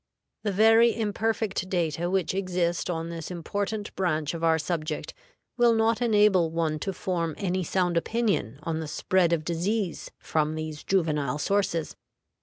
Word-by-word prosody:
The 210 - -1
very 225 +3 +5
imperfect 215 -3 -1
data 170 -2 0
which 185 -3 0
exist 180 -3 -1
on 165 -1 -2
this 165 -2 -6
important 205 +4 -4
branch 155 -5 0
of 165 0 -5
our 165 -1 +4
subject 155 -1 -3 0.4
will 240 -1 +5
not 225 +1 +2
enable 210 -7 +4
one 160 -2 -1
to 195 - -2
form 170 -3 -2
any 185 -1 -1
sound 175 0 0
opinion 200 - 0
on 160 0 -2
the 160 - -4
spread 175 +3 +1
of 160 -2 0
disease 180 +3 -2
from 155 0 -1
these 155 -1 -5
juvenile 150 -7 0
sources. 170 -2 0
175 Hz, 150 wpm, -27 LUFS, 160-200 Hz, 0.4 s, very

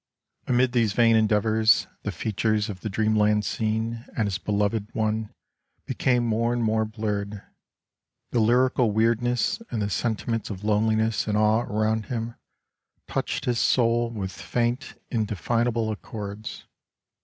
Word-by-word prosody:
Amid 125 0 +3
these 115 -4 +2
vain 115 -1 +4
endeavors 110 +1 +3 0.2
the 105 - -3
features 110 +3 -1
of 95 -3 -6
the 110 - -4
dreamland 105 0 +2
scene 110 +1 -2
and 110 - +2
his 100 -2 -2
beloved 105 +1 0
one 110 0 -1 0.5
became 125 -2 +1
more 115 +1 +1
and 120 -1 0
more 110 0 +2
blurred; 105 -2 -3 0.9
the 120 - +1
lyrical 125 +2 +3
weirdness 115 - +1
and 115 - -2
the 105 0 -1
sentiments 115 +1 -1
of 100 -1 -6
loneliness 110 +1 +1
and 105 -1 +1
awe 110 +1 +3
around 110 +1 0
him, 115 -1 -3 0.7
touched - - -2
his 120 -2 +1
soul 120 -1 +2
with 100 -5 -4
faint 120 - -2 0.2
indefinable 115 +1 0
accords. 105 0 -7
110 Hz, 130 wpm, -25 LUFS, 105-115 Hz, 0.9 s, vain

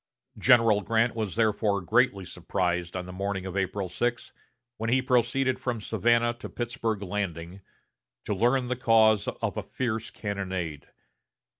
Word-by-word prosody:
General 115 -5 +5
Grant 115 +3 +1
was 110 -5 -3
therefore 105 -2 +1
greatly 105 0 +2
surprised 90 0 -2
on 90 - -4
the 90 - -9
morning 100 0 -3
of 95 -1 -6
April 95 0 -1
6, 120 +7 -2 0.4
when 115 +1 -2
he 130 +2 +4
proceeded 130 +1 +1
from 120 -3 -2
Savannah 120 +3 +2
to - - -7
Pittsburg 115 -3 -3
Landing, 90 -2 -4 0.6
to - - -1
learn 125 +5 +2
the 125 - -1
cause 110 -4 +4
of - - -3
a - - 0
fierce 115 -3 -3
cannonade. 95 -7 -4
110 Hz, 145 wpm, -27 LUFS, 95-120 Hz, 0.6 s, General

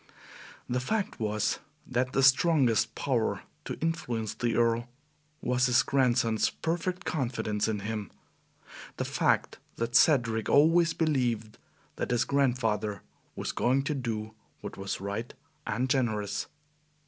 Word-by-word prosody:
The 125 +1 0
fact 205 +10 -2
was 110 -1 0 0.3
that 130 0 -1
the 135 - +2
strongest 130 - +4
power 125 -5 0 0.2
to - - -4
influence 120 -9 -2
the 120 -2 -1
Earl 120 0 +1 0.5
was 125 0 +2
his 125 -1 +4
grandson's 120 -4 +2
perfect 180 +3 -3
confidence 115 - -1
in 105 -2 -2
him 105 -1 -4 0.9
the - - -2
fact - - +1 0.2
that 115 +1 -3
Cedric 115 -7 +4
always 165 +3 +5
believed 120 -9 0 0.4
that - - -2
his 120 -1 +2
grandfather 115 -7 0 0.3
was - - -3
going 130 +3 +1
to 150 - -1
do 110 -5 -3 0.3
what - - -7
was 95 0 -4
right 100 +4 -4 0.4
and 125 +5 0
generous. 110 -7 0
120 Hz, 125 wpm, -29 LUFS, 110-135 Hz, 0.9 s, always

